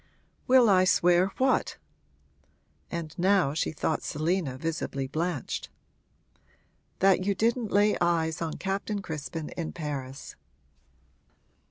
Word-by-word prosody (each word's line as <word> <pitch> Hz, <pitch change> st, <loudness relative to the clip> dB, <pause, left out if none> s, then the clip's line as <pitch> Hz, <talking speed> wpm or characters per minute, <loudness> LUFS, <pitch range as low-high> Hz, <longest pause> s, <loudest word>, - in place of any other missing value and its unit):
'Will 255 Hz, -2 st, +6 dB
I 185 Hz, -3 st, +5 dB
swear 180 Hz, 0 st, +4 dB
what?' 260 Hz, 0 st, +1 dB, 1.1 s
And 165 Hz, -3 st, -5 dB
now 185 Hz, -5 st, +3 dB
she 155 Hz, -, -1 dB
thought 155 Hz, 0 st, -1 dB
Selina 155 Hz, -3 st, -1 dB
visibly 155 Hz, -3 st, -3 dB
blanched. 155 Hz, 0 st, -3 dB, 1.3 s
'That 190 Hz, -1 st, +4 dB
you 200 Hz, +1 st, 0 dB
didn't 230 Hz, +1 st, 0 dB
lay 205 Hz, +1 st, +4 dB
eyes 165 Hz, -1 st, +1 dB
on 160 Hz, -2 st, -2 dB
Captain 200 Hz, +1 st, -3 dB
Crispin 160 Hz, -1 st, -5 dB
in 165 Hz, -2 st, -5 dB
Paris.' 140 Hz, -4 st, -6 dB
175 Hz, 110 wpm, -28 LUFS, 155-195 Hz, 1.3 s, Will